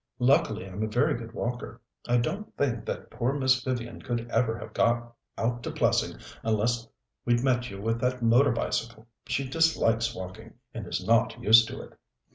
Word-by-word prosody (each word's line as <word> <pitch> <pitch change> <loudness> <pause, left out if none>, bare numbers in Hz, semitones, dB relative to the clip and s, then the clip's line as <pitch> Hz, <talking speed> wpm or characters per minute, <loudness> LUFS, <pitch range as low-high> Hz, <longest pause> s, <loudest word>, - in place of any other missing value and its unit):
"Luckily 125 - +2
I'm 95 +2 -6
a 110 - 0
very 125 +8 +2
good 115 -2 -6
walker. 120 -1 -4 0.3
I 120 0 +3
don't 195 - -3
think 120 -6 0
that - - -5
poor 125 +3 -1
Miss 130 -3 +2
Vivian 120 -2 -4
could 120 -2 -3
ever 115 -1 +1
have - - -9
got 120 0 +1 0.2
out 120 +1 -1
to - - -4
Plessing - - +1 0.2
unless 115 +2 0 0.4
we'd 120 0 +2
met 125 -2 +1
you 100 - -8
with 115 +3 -1
that 125 -1 0
motor 120 +5 +5
bicycle. 115 0 -2 0.2
She 135 -1 -1
dislikes 130 -7 +2
walking, 95 +5 -9 0.2
and 110 -5 -6
is 90 - -3
not 115 +2 +2
used 115 -1 +7
to - - -7
it." - - -14
120 Hz, 180 wpm, -28 LUFS, 115-125 Hz, 0.4 s, used